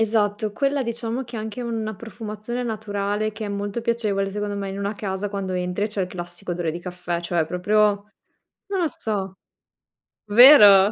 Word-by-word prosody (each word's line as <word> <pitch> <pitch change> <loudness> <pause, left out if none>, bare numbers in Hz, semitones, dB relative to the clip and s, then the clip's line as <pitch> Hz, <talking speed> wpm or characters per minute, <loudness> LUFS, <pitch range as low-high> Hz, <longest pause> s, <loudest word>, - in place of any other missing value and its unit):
Esatto, 210 -1 +1
quella 275 +4 0
diciamo 235 +2 -3
che 240 -1 -8
anche 220 +2 -5
una 225 -2 -3
profumazione 220 +2 -6
naturale, 215 -2 -2
che 215 +1 -6
è - - -4
molto 205 +2 -3
piacevole, 210 -4 0
secondo 205 0 -3
me, 200 -1 -3
in 195 +1 -5
una 200 +1 -2
casa 200 0 -3
quando 195 -2 -3
entri 180 +2 -1
e - - +1
c'è 205 -2 -2
il - - -1
classico 175 +1 -6
odore 170 -2 -2
di 165 - -5
caffè, 175 -1 -4
cioè 170 -1 0
proprio, 180 +6 0 0.9
non 395 -2 -2
lo 335 - +2
so, 195 -8 -3 0.9
vero? 210 -4 +9
205 Hz, 175 wpm, -23 LUFS, 195-225 Hz, 0.9 s, vero